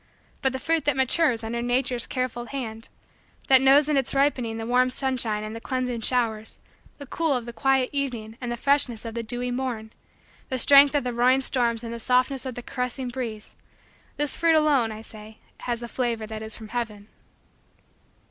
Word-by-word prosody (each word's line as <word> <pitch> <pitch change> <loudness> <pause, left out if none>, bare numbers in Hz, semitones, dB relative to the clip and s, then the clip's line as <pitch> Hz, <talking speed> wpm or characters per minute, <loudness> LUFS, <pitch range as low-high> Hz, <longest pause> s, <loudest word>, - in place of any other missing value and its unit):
But 265 - +2
the 260 - -3
fruit 325 +4 0
that 290 -2 +3
matures 265 -2 +2
under 235 +1 -3
Nature's 245 0 0
careful 255 -2 -3
hand; 230 -4 -6 0.6
that 265 -1 +8
knows 275 +2 +5
in 300 -2 +1
its 270 0 0
ripening 255 -5 +1
the 225 - -5
warm 250 +2 +3
sunshine 250 -5 -1
and 215 +1 -6
the 230 - -7
cleansing 250 -2 -2
showers, 225 -3 0 0.4
the 285 - -9
cool 320 +2 0
of 245 -3 -2
the 235 - -8
quiet 265 0 +1
evening 240 -6 -3
and 245 -1 -4
the 240 - -3
freshness 265 -4 +1
of 225 - -5
the 235 - -3
dewy 245 +2 -1
morn, 245 -4 -4 0.6
the 260 - -1
strength 280 +3 +7
of 290 - +2
the 250 -1 -3
roaring 250 +3 +3
storms 240 -3 0
and 230 0 -5
the 235 - -6
softness 255 +3 +1
of 255 - -6
the 245 - -7
caressing 250 +1 -4
breeze 235 -4 -6 0.6
this 295 -2 -1
fruit 330 -1 +3
alone, 290 -7 +3
I 215 0 -8
say, 215 0 -12 0.2
has 240 -1 -3
the 240 - -5
flavor 235 -3 -2
that 215 0 -7
is 220 0 -5
from 220 -2 -11
heaven. 215 -3 -5
245 Hz, 195 wpm, -25 LUFS, 230-265 Hz, 0.6 s, that